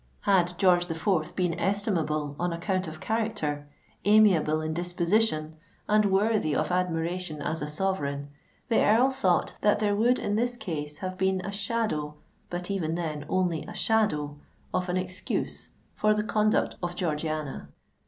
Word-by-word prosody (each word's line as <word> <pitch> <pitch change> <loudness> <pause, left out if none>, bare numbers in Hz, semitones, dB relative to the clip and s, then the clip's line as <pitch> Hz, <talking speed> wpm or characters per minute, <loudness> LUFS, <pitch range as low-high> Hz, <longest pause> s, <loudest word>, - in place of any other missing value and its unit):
Had 180 -3 +2
George 180 -2 +4
the 165 - -3
Fourth 160 -1 0
been 180 -2 +1
estimable 165 -7 0
on 175 0 0
account 185 +2 -1
of 155 0 -7
character, 210 -11 -2 0.4
amiable 200 -7 +5
in 155 0 -2
disposition, 170 -1 +1 0.3
and 210 0 +4
worthy 195 -5 +2
of 155 +2 0
admiration 175 -2 -1
as 155 +2 -2
a 150 - -2
sovereign, 145 -4 -2 0.4
the 230 - +3
Earl 240 +6 +4
thought 190 -10 +1
that 210 - +4
there 205 -1 +1
would 240 +4 +3
in 205 - -1
this 245 +1 0
case 150 -7 -5
have 185 +1 -5
been 190 0 +2
a 200 - -5
shadow—but 180 -4 -3
even 165 -5 -1
then, 155 -4 -4
only 180 -4 +1
a - - -9
shadow—of 180 -3 -1
an 180 - +1
excuse 185 0 -3 0.2
for 215 0 +2
the 210 - 0
conduct 215 0 +1
of 175 0 -3
Georgiana. 155 -4 -3
180 Hz, 150 wpm, -27 LUFS, 155-205 Hz, 0.4 s, amiable